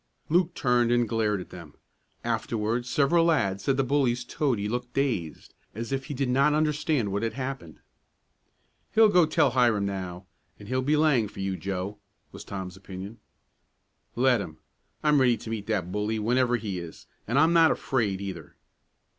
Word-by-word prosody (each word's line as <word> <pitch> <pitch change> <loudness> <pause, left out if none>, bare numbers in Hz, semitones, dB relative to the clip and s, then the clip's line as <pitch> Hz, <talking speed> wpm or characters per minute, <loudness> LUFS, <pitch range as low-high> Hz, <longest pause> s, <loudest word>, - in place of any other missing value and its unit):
Luke 175 +2 +2
turned 120 -3 +2
and 120 -1 +2
glared 105 -3 0
at - - -12
them. 85 -5 -11 0.5
Afterward 115 +2 -1
several 150 +6 +3
lads 100 - +1
said 135 -1 +1
the 135 - +2
bully's 130 -3 +1
toady 120 -10 -1
looked 120 +2 -4
dazed, 115 - -2 0.2
as 115 +3 -5
if 135 -1 -2
he 145 - -5
did 135 0 -1
not 140 +4 +3
understand 150 - 0
what 100 +1 -1
had 115 0 -2
happened. 130 - -6 1.1
"He'll 220 -1 +7
go 180 -5 +4
tell 135 - +3
Hiram 120 -5 +2
now, 95 -2 -5 0.3
and 105 - -12
he'll 130 +2 0
be 150 +4 +2
laying 145 -8 +3
for 100 - -12
you, 95 -1 -2
Joe," 100 +2 -4 0.3
was - - -10
Tom's 95 -2 -6
opinion. 95 +3 -9 1.0
"Let 125 -2 +3
him. 80 -5 -8 0.5
I'm 150 -2 +4
ready 120 -3 +4
to 110 - -8
meet 105 -3 -4
that 95 -5 -1
bully 105 +2 -1
whenever 120 +3 +2
he 100 -5 -4
is, 85 -2 -10 0.2
and 120 +5 0
I'm 160 +3 +5
not 165 -1 +6
afraid, 105 -7 -1
either." 90 -6 -7
120 Hz, 170 wpm, -27 LUFS, 100-135 Hz, 1.1 s, He'll